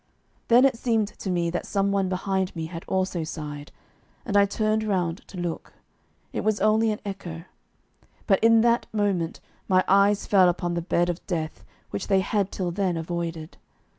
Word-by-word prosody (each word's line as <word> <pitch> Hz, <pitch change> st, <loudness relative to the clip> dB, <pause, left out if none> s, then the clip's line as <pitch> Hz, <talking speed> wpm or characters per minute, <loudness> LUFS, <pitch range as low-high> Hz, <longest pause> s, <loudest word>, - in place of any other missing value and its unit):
Then 245 Hz, +3 st, +6 dB
it 265 Hz, -4 st, +2 dB
seemed 225 Hz, -5 st, +1 dB
to 195 Hz, -, -7 dB
me 170 Hz, -2 st, 0 dB
that 175 Hz, -, -3 dB
some 200 Hz, -1 st, +1 dB
one 195 Hz, -2 st, +1 dB
behind 190 Hz, 0 st, -1 dB
me 165 Hz, -1 st, -3 dB
had 165 Hz, +1 st, -7 dB
also 185 Hz, -3 st, -1 dB
sighed, 150 Hz, -2 st, -7 dB, 0.5 s
and 205 Hz, -, -3 dB
I 200 Hz, 0 st, +6 dB
turned 215 Hz, +1 st, 0 dB
round 185 Hz, -4 st, -1 dB
to 190 Hz, -, -11 dB
look. 175 Hz, -2 st, -4 dB, 0.6 s
It -, -, -2 dB
was 215 Hz, -1 st, +1 dB
only 215 Hz, +2 st, +3 dB
an 210 Hz, -, -3 dB
echo. 175 Hz, -5 st, -6 dB, 0.8 s
But 195 Hz, 0 st, +2 dB
in 225 Hz, 0 st, +6 dB
that 235 Hz, 0 st, +2 dB
moment 200 Hz, -6 st, -1 dB, 0.3 s
my 185 Hz, -1 st, +4 dB
eyes 200 Hz, +1 st, +4 dB
fell 190 Hz, -3 st, +5 dB
upon 175 Hz, 0 st, -2 dB
the 170 Hz, -, -1 dB
bed 175 Hz, 0 st, +1 dB
of 175 Hz, -, -9 dB
death 160 Hz, -4 st, -3 dB, 0.3 s
which 195 Hz, -, -4 dB
they 195 Hz, -2 st, +3 dB
had 200 Hz, 0 st, -1 dB
till 180 Hz, -2 st, -2 dB
then 185 Hz, -1 st, -1 dB
avoided. 165 Hz, -1 st, -4 dB
190 Hz, 180 wpm, -25 LUFS, 170-205 Hz, 0.8 s, Then